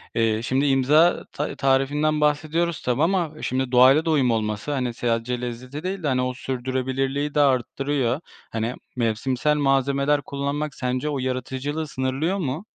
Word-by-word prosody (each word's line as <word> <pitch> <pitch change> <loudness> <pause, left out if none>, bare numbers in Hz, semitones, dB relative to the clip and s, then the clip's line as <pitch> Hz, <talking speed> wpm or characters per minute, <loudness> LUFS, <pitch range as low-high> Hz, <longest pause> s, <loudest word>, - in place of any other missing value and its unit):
Eee, 110 -1 +1
şimdi 130 +4 0
imza 145 +5 +4
ta 150 - -3
tarifinden 145 +3 +1
bahsediyoruz 155 +3 +1
tabii 125 +2 0
ama 175 -2 +1
şimdi 130 0 -1
doğayla 130 +5 +6
da 165 - +1
uyum 135 -5 +3
olması, 110 +3 -2
hani, 125 -4 -1
sadece 120 +1 -1
lezzeti 125 +5 -6
değil 185 0 -3
de, - - 0
hani, 130 -2 +1
o 125 0 -1
sürdürebilirliği 130 +3 -2
de - - +3
arttırıyor. 135 -1 +1 0.3
Hani, 115 +3 -2 0.2
mevsimsel 125 +5 0
malzemeler 140 +1 +2
kullanmak 140 +2 -3
sence 125 +3 -2
o 145 -2 -2
yaratıcılığı 130 +4 -3
sınırlıyor 135 +8 -1
mu? 155 +2 -3
135 Hz, 150 wpm, -23 LUFS, 125-150 Hz, 0.3 s, doğayla